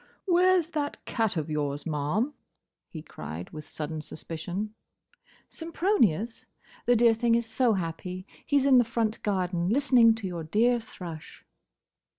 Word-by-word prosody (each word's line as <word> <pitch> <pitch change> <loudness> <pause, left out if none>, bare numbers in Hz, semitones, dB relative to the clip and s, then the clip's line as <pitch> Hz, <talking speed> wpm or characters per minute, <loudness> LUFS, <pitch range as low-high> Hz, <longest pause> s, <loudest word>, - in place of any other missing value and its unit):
"Where's 360 -2 +3
that 290 -2 -3
cat 225 -6 0
of 155 - -2
yours, 145 -2 -2
ma'am?" 165 - -1 0.6
he 155 -2 -8
cried, 80 - -8
with 155 -1 -8
sudden 155 0 -5
suspicion. 175 +7 -5 0.7
"Sempronius? 325 - 0 0.4
The 245 - +5
dear 230 0 +5
thing 230 +1 +2
is 235 0 +1
so 230 +1 +2
happy. 180 0 -4 0.2
He 285 - +2
's 275 - +2
in 265 -2 +7
the - - +5
front 230 -1 -1
garden, 180 -3 0
listening 245 -2 +5
to 225 -3 -6
your 175 -3 -4
dear 235 +9 +2
thrush." 175 -8 -10
215 Hz, 145 wpm, -28 LUFS, 165-245 Hz, 0.7 s, in